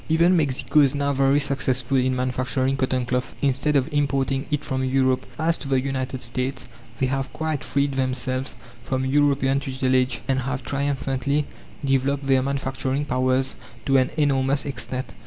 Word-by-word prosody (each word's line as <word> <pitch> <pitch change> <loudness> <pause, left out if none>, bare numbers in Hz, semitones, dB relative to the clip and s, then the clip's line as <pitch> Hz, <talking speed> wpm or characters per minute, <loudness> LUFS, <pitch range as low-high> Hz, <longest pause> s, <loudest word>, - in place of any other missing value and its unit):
Even 170 +3 +4
Mexico 145 -1 +2
is 140 -1 +4
now 140 0 0
very 135 +1 +3
successful 135 -2 0
in 130 0 +2
manufacturing 130 +1 0
cotton 130 -2 0
cloth, 125 +1 -2
instead 140 +2 +2
of 135 -1 +3
importing 140 -1 0
it 150 -1 -1
from 130 0 -1
Europe. 130 0 +1
As 165 +1 +1
to 140 - -6
the 135 -1 +2
United 130 -1 -3
States 125 +1 -3 0.3
they 130 - +1
have 135 0 -2
quite 155 -3 -2
freed 140 0 0
themselves 130 0 -2 0.3
from 130 +1 -1
European 140 -1 +2
tutelage, 130 -2 0
and 130 -1 +1
have 135 0 -3
triumphantly 140 0 -1 0.4
developed 135 +1 +1
their 135 -1 +4
manufacturing 135 +1 -2
powers 130 0 +1 0.3
to 135 0 +4
an 130 -1 +3
enormous 140 -2 +2
extent. 130 -2 -4
135 Hz, 155 wpm, -24 LUFS, 130-140 Hz, 0.4 s, Even